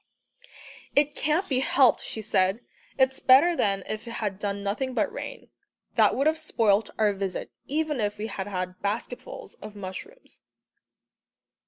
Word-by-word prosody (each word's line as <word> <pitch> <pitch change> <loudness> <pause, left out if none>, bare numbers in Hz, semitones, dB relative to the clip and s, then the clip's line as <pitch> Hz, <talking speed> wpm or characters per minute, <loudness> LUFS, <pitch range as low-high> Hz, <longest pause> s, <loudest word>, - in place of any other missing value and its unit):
"It 295 +1 +3
can't 310 +6 0
be 260 -3 +1
helped," 265 -1 +4
she 220 - -4
said. 195 +1 +2 0.4
"It's 265 0 +3
better 290 +7 +6
than 195 - +1
if 215 +2 -5
it 230 - -5
had 200 -4 -3
done 200 -1 -3
nothing 250 +6 -2
but - - 0
rain. - - -7 0.4
That - - +4
would 275 - +1
have 315 +1 +2
spoilt 220 -8 +2
our 210 -2 +3
visit, 195 -1 -4 0.2
even 300 -1 -1
if 205 0 -1
we 210 - -4
had 195 -3 -5
had 185 -2 -4
basketfuls 220 +4 -4
of 210 0 -9
mushrooms." 205 - -9
220 Hz, 155 wpm, -27 LUFS, 200-275 Hz, 0.4 s, better